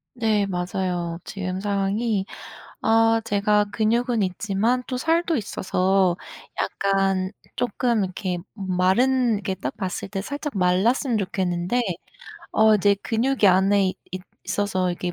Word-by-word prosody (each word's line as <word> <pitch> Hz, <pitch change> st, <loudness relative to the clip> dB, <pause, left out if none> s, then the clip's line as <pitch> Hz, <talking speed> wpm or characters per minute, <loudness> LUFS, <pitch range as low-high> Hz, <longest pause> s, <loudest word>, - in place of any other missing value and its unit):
네 220 Hz, -4 st, +1 dB
맞아요. 180 Hz, -2 st, -2 dB
지금 185 Hz, -1 st, -4 dB
상황이 200 Hz, +1 st, 0 dB, 0.6 s
아 225 Hz, 0 st, +4 dB
제가 210 Hz, -1 st, +2 dB
근육은 230 Hz, +1 st, +1 dB
있지만 205 Hz, +6 st, 0 dB
또 255 Hz, -, -3 dB
살도 330 Hz, +4 st, +1 dB
있어서 190 Hz, -4 st, +1 dB, 0.4 s
약간 195 Hz, -1 st, 0 dB, 0.2 s
쪼끔 240 Hz, -2 st, 0 dB
이렇게 185 Hz, -1 st, -3 dB, 0.2 s
마른 215 Hz, +6 st, +2 dB
이렇게 200 Hz, -2 st, -2 dB
딱 130 Hz, -7 st, -5 dB
봤을 190 Hz, -1 st, -4 dB
때 195 Hz, 0 st, -4 dB
살짝 285 Hz, +1 st, -5 dB
말랐으면 210 Hz, +7 st, +2 dB
좋겠는데 185 Hz, +2 st, -1 dB, 0.7 s
어 220 Hz, 0 st, +5 dB
이제 205 Hz, 0 st, +4 dB
근육이 240 Hz, 0 st, +1 dB
안에 190 Hz, +1 st, +4 dB, 0.5 s
있어서 185 Hz, -3 st, 0 dB
이게 175 Hz, 0 st, -3 dB
200 Hz, 250 characters per minute, -23 LUFS, 185-225 Hz, 0.7 s, 어